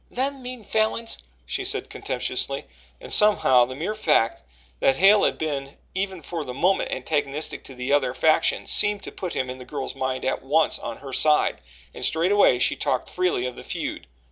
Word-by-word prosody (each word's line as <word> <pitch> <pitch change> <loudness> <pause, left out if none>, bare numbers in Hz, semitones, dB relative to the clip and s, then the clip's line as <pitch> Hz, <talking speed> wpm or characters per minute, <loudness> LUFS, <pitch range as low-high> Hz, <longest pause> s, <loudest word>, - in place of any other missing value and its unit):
"Them 270 +2 -2
mean 250 -2 -7
Falins!" 220 +2 -1 0.3
she - - -3
said - - -3
contemptuously, - - -2 0.3
and - - -3
somehow 165 -12 +5
the 130 +1 -8
mere 170 +9 -3
fact 155 - +1 0.4
that 135 - +3
Hale 195 +6 +6
had - - +1
been 140 -3 -4 0.2
even 190 -3 -3
for 165 -1 -4
the 125 -3 -7
moment 190 +7 +1
antagonistic 145 +2 -2
to 135 - -9
the 125 +3 -2
other 135 -3 +2
faction 155 -1 +2
seemed 205 -1 +3
to - - -7
put 180 -2 -5
him 130 - -1
in 130 +1 -7
the - - -8
girl's 135 +1 -5
mind 130 0 -3
at 130 - -1
once 150 +4 +1
on 115 - -6
her 135 -1 -9
side, 150 - +3 0.3
and - - -7
straightway 175 -3 +4
she 125 - +2
talked 130 - -1
freely 180 -9 0
of 125 -1 -4
the - - -9
feud. - - -4
155 Hz, 190 wpm, -24 LUFS, 130-195 Hz, 0.4 s, Hale